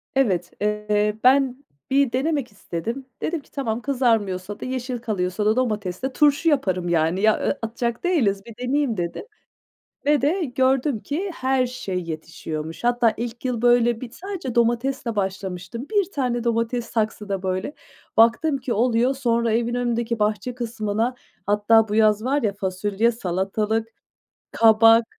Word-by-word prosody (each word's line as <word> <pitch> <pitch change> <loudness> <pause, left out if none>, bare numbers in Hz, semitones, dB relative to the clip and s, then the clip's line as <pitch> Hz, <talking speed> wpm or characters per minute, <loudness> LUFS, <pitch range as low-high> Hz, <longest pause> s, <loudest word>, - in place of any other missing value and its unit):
Evet, 190 -10 +1
eee, 210 0 +1
ben 265 0 +4 0.3
bir 275 -2 +3
denemek 275 -1 -1
istedim. 220 +7 -5 0.2
Dedim 330 0 -1
ki: - - -27
"Tamam, 240 -4 -2
kızarmıyorsa 215 -8 0
da - - -6
yeşil 255 -1 -3
kalıyorsa 205 -3 -2
da 215 +1 +3
domates 210 -7 -1
ile 265 - -2
turşu 300 +3 +3
yaparım, 185 - 0
yani. 170 +3 +1
Ya, 220 0 +5
ı - - -1
atacak 235 +3 -3
değiliz, 220 - +1
bir 230 - -11
deneyeyim." 275 -5 +1
dedim 170 - -3 0.8
ve 295 0 +4
de 330 +7 +1
gördüm 260 -1 +1
ki 355 - -3
her 260 -2 +1
şey 195 -7 -4
yetişiyormuş. 160 +1 -6
Hatta 240 -2 +3
ilk 235 +1 -5
yıl, 245 -3 -2
böyle, 240 -1 +4
bir 245 -2 -7
sadece 360 - -6
domatesle 235 0 0
başlamıştım. 190 +4 -4
1 405 -4 +1
tane 245 -5 -1
domates 235 +1 0
saksıda, 215 -4 -2
böyle, 185 +9 -2 0.4
baktım 240 +7 +4
ki 255 -1 -3
oluyor. 240 +3 +2
Sonra 235 -3 +1
evin 235 +1 0
önündeki 235 -1 -1
bahçe 215 +4 -1
kısmına 230 0 -2 0.3
Hatta 210 +2 +4
bu 205 - -2
yaz 215 0 +3
var 280 +3 +1
ya 210 -3 +1
fasulye, 200 +4 0
salatalık, 210 +2 -1 0.6
kabak, 225 +1 +6
230 Hz, 150 wpm, -23 LUFS, 210-255 Hz, 0.8 s, kabak